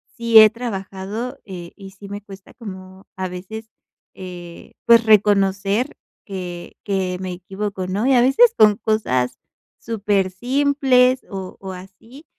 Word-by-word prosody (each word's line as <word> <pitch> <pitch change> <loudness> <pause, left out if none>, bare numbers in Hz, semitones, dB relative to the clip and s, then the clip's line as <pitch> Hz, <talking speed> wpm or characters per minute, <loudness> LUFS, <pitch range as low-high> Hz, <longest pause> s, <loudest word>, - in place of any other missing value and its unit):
sí 230 -1 +6
he 215 0 +9
trabajado, 220 +2 -5
eh, 175 -3 -9
y 195 -2 -11
sí 200 +1 -13
me 205 +1 -6
cuesta 195 -1 -14
como 190 -3 -10
a 185 0 -2
veces, 220 +5 -8 0.5
eh, 175 -2 -10
pues 230 -1 +6
reconocer 205 +3 +2 0.3
que 180 -3 -7
que 190 -2 -2
me 185 -1 -5
equivoco, 190 +1 -5
¿no? 200 +6 -1
Y 270 - +4
a 245 - +5
veces 445 - +5
con 210 -1 +6
cosas 130 - -1 0.4
súper 205 -4 -1
simples, 255 +2 +2
o 190 -1 -7
o 190 -1 -7
así 210 - -13
200 Hz, 140 wpm, -20 LUFS, 185-230 Hz, 0.5 s, he